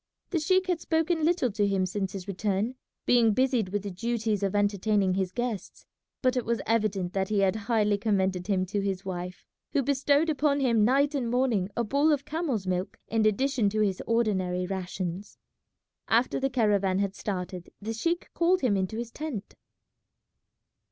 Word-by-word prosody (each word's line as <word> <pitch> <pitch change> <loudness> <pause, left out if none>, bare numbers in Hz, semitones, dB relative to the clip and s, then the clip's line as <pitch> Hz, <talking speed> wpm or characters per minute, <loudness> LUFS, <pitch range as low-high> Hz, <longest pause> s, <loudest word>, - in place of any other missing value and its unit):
The 345 - +1
sheik 370 +5 +2
had 360 -3 -1
spoken 320 0 0
little 325 -7 +2
to 205 0 +1
him 195 -2 +1
since 195 0 -3
his 195 -1 -6
return, 200 +4 -1 0.3
being 235 -3 +4
busied 255 -6 +2
with 205 +1 -2
the 200 - -4
duties 220 +1 -1
of 200 0 -1
entertaining 205 -1 +2
his 190 -1 -1
guests; 240 -4 -4 0.4
but 255 0 +3
it 250 - 0
was 235 0 -1
evident 210 -5 0
that 190 -1 -1
he 210 -2 +2
had 195 0 +2
highly 210 -2 +1
commended 190 -4 0
him 190 -3 +1
to 200 +2 -2
his 195 -1 -3
wife, 180 -1 -5 0.3
who 285 -3 +2
bestowed 285 +3 +2
upon 295 -2 +1
him 235 -5 +3
night 275 +6 +3
and 255 -5 -1
morning 240 -6 +1
a 235 - +2
bowl 280 +7 +2
of 285 -2 0
camel's 300 - -2
milk 185 0 -2
in 220 -1 +2
addition 245 0 +1
to 215 +1 -1
his 195 -3 0
ordinary 190 -6 +1
rations. 185 0 -5 0.7
After 235 +3 +2
the 270 0 0
caravan 205 -6 +2
had 200 -1 0
started 180 -3 -5
the 220 +2 -4
sheik 335 +10 -2
called 355 +2 +2
him 245 -6 +2
into 190 +3 -1
his 235 0 -5
tent. 285 -10 -6
215 Hz, 180 wpm, -28 LUFS, 195-260 Hz, 0.7 s, being